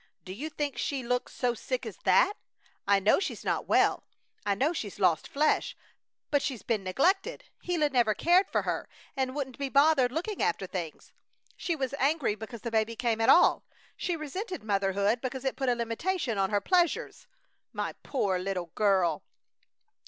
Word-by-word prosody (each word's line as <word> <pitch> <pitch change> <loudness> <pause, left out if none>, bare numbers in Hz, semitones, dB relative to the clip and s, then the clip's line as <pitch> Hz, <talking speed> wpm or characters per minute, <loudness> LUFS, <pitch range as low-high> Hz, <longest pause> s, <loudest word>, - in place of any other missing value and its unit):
"Do 185 - -6
you 285 +10 -5
think 290 -4 -3
she 275 -3 -2
looks 250 +1 -1
so 245 -2 0
sick - - -4
as - - -7
that? 410 - +5 0.5
I 200 0 +5
know 205 - +4
she's 380 - -4
not - - -1
well. - - +3 0.4
I 200 - +2
know 280 - +1
she's 210 - -5
lost 180 -5 +2
flesh! 300 +2 +1 0.5
But 285 -1 +3
she's 255 -8 -4
been 220 -4 -1
neglected. 375 - +1 0.2
Gila 335 -4 0
never 240 -6 +2
cared 360 +3 +4
for - - 0
her - - -3 0.3
and 265 0 -1
wouldn't 265 -3 -4
be 280 -1 -2
bothered 280 -2 +4
looking 360 +8 -3
after 180 +3 0
things. 175 -4 -6 0.4
She 340 - -2
was 270 -3 -3
angry 280 -4 +2
because 220 +2 -8
the 235 - -4
baby 220 +1 0
came 225 -1 0
at 225 - +3
all. - - +6 0.3
She 355 - -2
resented 365 - -5
motherhood 200 +2 +1
because 260 0 -4
it 265 - 0
put 265 -2 -1
a 245 - +2
limitation 235 - -2
on 195 0 +2
her 205 -1 +1
pleasures. 355 - 0 0.4
My - - -3
poor 195 -9 -1
little 180 -3 -3
girl!" 195 -4 +2
250 Hz, 175 wpm, -29 LUFS, 205-300 Hz, 0.5 s, all